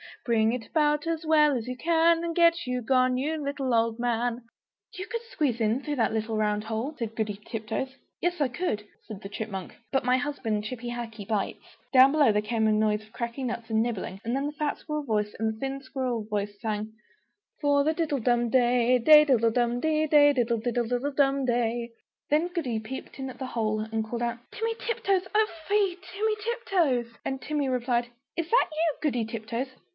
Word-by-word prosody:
Bring 225 -1 +3
it 245 -2 -4
about 300 -1 +1
as 330 -1 -2
well 300 -2 +5
as 235 -1 -3
you 255 - -3
can, 330 +3 +3
And 335 -1 -3
get 335 -4 +4
you 250 0 -1
gone, 255 +1 +3
you 300 +3 -2
little 280 -3 -2
old 230 0 +2
man!" 240 0 -1 0.5
"You 370 +2 -6
could 465 +1 -3
squeeze 280 - 0
in, 225 +3 +1
through 295 0 -3
that 225 -4 +1
little 220 0 -1
round 210 -1 0
hole," 225 +7 -3
said 225 -3 -4
Goody 210 -2 -2
Tiptoes. 225 +4 -4 0.2
"Yes, 350 0 -1
I 285 - +3
could," 245 - -2 0.2
said 215 -3 -8
the 195 - -7
Chipmunk, 200 -3 -6 0.2
"but 270 0 +1
my 250 +1 +3
husband, 255 -7 -2
Chippy 240 +2 -5
Hackee, 225 -4 -6
bites!" 210 -3 -3 0.2
Down 260 +1 +8
below 290 -6 +4
there 210 0 +2
was 210 +2 -8
a 230 - 0
noise 215 0 +2
of 215 - -20
cracking 235 +2 -4
nuts 235 -1 -5
and 220 0 +2
nibbling; 220 -4 -3
and 235 +2 -1
then 275 +2 -1
the - - -3
fat 295 -1 -2
squirrel 300 -1 -4
voice 210 -5 -1
and 220 0 0
the 220 - -14
thin 270 +1 -3
squirrel 255 -4 -3
voice 205 -1 -3
sang 215 -1 -3 0.7
"For 285 -1 +3
the 310 +2 +2
diddlum 250 -7 +1
day 245 0 +4
Day 300 +4 +8
diddle 230 -5 +3
dum 240 +1 +1
di! 310 +2 +1
Day 290 -1 +6
diddle 235 -3 +1
diddle 245 +3 -1
dum 275 -1 +2
day!" 235 -1 0 0.4
Then 310 +4 +3
Goody 310 -11 -2
peeped 230 +5 -8
in 265 0 -4
at 255 - -10
the 265 - -3
hole, 215 -3 -1
and 220 0 -2
called 235 +2 -5
down 235 0 -1
"Timmy 450 +2 -2
Tiptoes! 390 -5 0
Oh 430 0 +4 0.2
fie, 400 -3 +2 0.2
Timmy 430 +2 0
Tiptoes!" 340 - 0
And 265 -1 -3
Timmy 295 -2 -1
replied, 245 -1 0 0.3
"Is 335 -1 -2
that - - +4
you, 315 0 0
Goody 245 -7 0
Tiptoes? 230 +3 -4
250 Hz, 200 wpm, -27 LUFS, 225-295 Hz, 0.7 s, Down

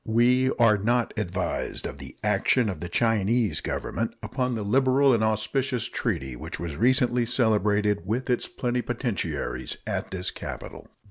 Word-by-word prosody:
We 125 +3 +3
are 110 -3 +5
not 120 +3 +1
advised 90 -4 -3
of 70 - -6
the 65 -1 -10
action 105 +3 +2
of 90 -6 -4
the 85 +2 -5
Chinese 115 +1 +1
Government - - -3
upon 125 -1 -1
the 110 - -3
liberal 130 +4 +4
and 110 -2 +2
auspicious 110 +3 0
treaty 70 - -2
which - - -6
was 85 -4 -4
recently 125 - +3
celebrated 105 -5 +2
with 120 +5 -1
its 125 -2 0
plenipotentiaries 120 - -2
at - - -3
this 95 -1 -2
capital. - - -8
110 Hz, 145 wpm, -26 LUFS, 100-125 Hz, -, are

